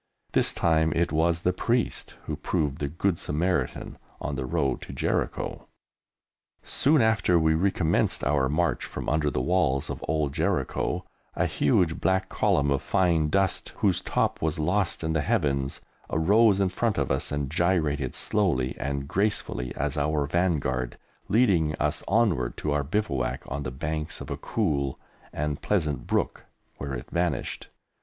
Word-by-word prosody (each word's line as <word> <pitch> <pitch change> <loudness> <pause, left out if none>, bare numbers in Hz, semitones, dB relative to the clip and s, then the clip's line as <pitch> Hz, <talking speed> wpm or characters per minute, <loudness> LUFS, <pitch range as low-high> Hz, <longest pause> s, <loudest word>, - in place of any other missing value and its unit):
This - - +3
time 80 -1 +2
it 85 +1 +1
was 80 +2 +2
the 90 - +1
Priest 120 +6 -1
who - - -3
proved 75 -1 -1
the 70 - -1
Good 85 +4 -1
Samaritan 85 +5 -1 0.2
on 75 - -3
the 65 0 -3
road 75 -4 0
to - - -8
Jericho. - - -2 1.0
Soon 145 -2 +3
after 105 -6 +3
we 80 -1 +3
recommenced 90 -1 +1
our 65 0 +2
march 80 +1 +1
from - - -6
under 75 -1 +1
the 65 - -2
walls 85 -6 +1
of - - -6
old 75 -2 0
Jericho - - -1 0.3
a - - +1
huge 80 +2 +1
black 95 0 +1
column 70 0 +2
of 70 - +1
fine 85 -5 +2
dust, 95 +3 0
whose 95 -4 +1
top - - 0
was 80 -1 0
lost 90 +4 0
in 80 0 0
the 80 - +1
Heavens, 70 - 0 0.3
arose 100 +6 +4
in 95 -2 +2
front 110 +4 0
of 70 -3 0
us - - 0
and 70 -2 -2
gyrated 75 -6 +1
slowly 80 -12 0
and 70 0 -2
gracefully 90 - -1
as - - -2
our 75 0 +1
vanguard, 70 -7 0 0.3
leading 90 -10 +3
us - - -1
onward 95 - +1
to 75 - -2
our 75 0 +1
bivouac 70 - -1
on 70 - -3
the 65 - -3
banks 75 +4 -4
of - - -7
a - - -2
cool 70 - -1 0.3
and 75 -1 -3
pleasant 75 -10 -1
brook, - - -1 0.3
where 70 -1 -4
it 60 +3 -8
vanished. 85 -6 -1
80 Hz, 160 wpm, -27 LUFS, 70-95 Hz, 1.0 s, arose